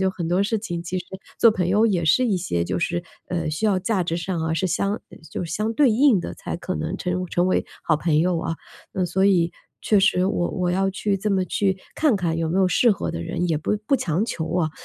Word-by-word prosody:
就 190 0 +2
很 175 -3 -4
多 180 +2 +2
事 210 +3 0
情 175 -5 -4
其 180 +2 -4
实 180 - -7 0.4
做 230 - +8
朋 190 -5 -1
友 210 +5 +4
也 180 -6 +1
是 160 +11 +4
一 205 -5 +1
些 85 - -1
就 90 +1 -2
是， 175 - -1 0.3
呃， 175 -3 -2
需 155 +8 -3
要 200 -3 +3
价 195 0 0
值 165 -1 -1
上 175 0 -3
啊， 160 0 -1
是 165 - -1
相 200 +4 -1 0.3
就 - - -3
相 210 +7 -2
对 280 -2 +4
应 235 -3 +4
的 - - -6
才 - - -5
可 175 +2 -4
能 165 +4 -3
成 180 -2 -2
成 175 +1 +1
为 - - +1 0.2
好 155 - +2
朋 155 -1 +1
友 175 0 +1
啊。 165 0 -2 0.4
那 190 -2 0
所 190 +2 +1
以 175 -4 +3 0.4
确 210 -2 +4
实 180 -1 +3
我 175 -3 0
我 180 -1 -1
要 195 +1 +1
去 200 +1 -1
这 210 +2 -2
么 190 -2 +2
去 190 0 0 0.2
看 295 -8 +3
看 170 -4 -1
有 165 -1 -1
没 180 +4 0
有 190 - +4
适 235 +6 +4
合 200 - -1
的 80 - -4
人， 175 - -2
也 160 - +1
不 210 - -1
不 - - +3
强 175 0 0
求 165 -9 -4
啊。 165 -4 +1
180 Hz, 270 characters per minute, -23 LUFS, 170-200 Hz, 0.4 s, 做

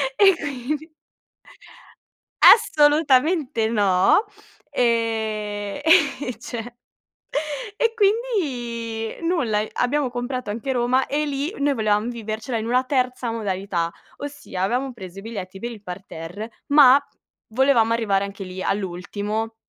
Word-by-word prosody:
E 390 -2 +6
quindi 290 +2 -4 1.5
Assolutamente 295 - +5
no! 200 - +3 0.5
Ehm, 220 -2 -1 0.4
e 250 -4 -5
cioè 240 0 -6 1.0
e 460 +1 +1
quindi 255 - -1
nulla, 245 -12 +1
ehm, 215 - -2
abbiamo 270 +2 0
comprato 245 -1 -4
anche 235 +5 -3
Roma 250 +1 +2
e 300 +2 -1
lì 290 +4 -3
noi 285 0 +2
volevam 215 -1 +1
vivercela 225 +1 -4
in 220 - -3
una 250 +2 +1
terza 255 -2 -1
modalità. 190 -6 -2 0.3
Ossia, 285 -10 -6
avevamo 250 +6 -1
preso 190 -4 -10
i - - -9
biglietti 195 -3 -7
per 235 +4 -4
il 220 -3 -10
parterre, 180 +3 -7 0.2
ma 280 -2 +7 0.5
volevamo 235 -1 +3
arrivare 210 -4 +1
anche 200 0 -6
lì 185 +1 -6
all'ultimo 205 +4 -3
235 Hz, 115 wpm, -23 LUFS, 210-275 Hz, 1.5 s, ma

